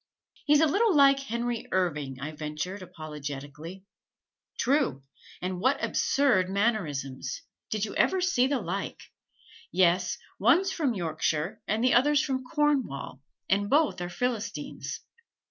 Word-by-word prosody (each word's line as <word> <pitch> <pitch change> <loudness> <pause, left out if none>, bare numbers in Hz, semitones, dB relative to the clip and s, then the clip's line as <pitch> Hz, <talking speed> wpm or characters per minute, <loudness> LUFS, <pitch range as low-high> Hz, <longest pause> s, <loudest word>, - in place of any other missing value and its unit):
"He's 295 +1 +6
a - - +6
little 400 +5 +3
like 275 -1 +6
Henry 240 -3 -3
Irving," 150 -8 -1
I 145 +3 -4
ventured 155 +6 -5
apologetically. 150 +1 -8 0.7
"True, 235 - +1 0.4
and 185 0 -2
what 260 +5 +3
absurd 230 -10 +2
mannerisms 180 - -1 0.3
did 215 -1 -1
you 210 - -7
ever 380 - +2
see 360 -9 +2
the 275 -1 0
like! 190 +2 -5 0.6
Yes, 180 0 +2 0.2
one's 340 - +4
from 285 -10 0
Yorkshire 160 -1 -2
and 215 +3 0
the 255 - +4
other's 290 +4 +4
from 260 -2 -2
Cornwall, 260 - -1 0.3
and 205 +1 +1
both 295 - +2
are 175 - -3
Philistines." 230 +6 -3
205 Hz, 130 wpm, -28 LUFS, -, 0.7 s, He's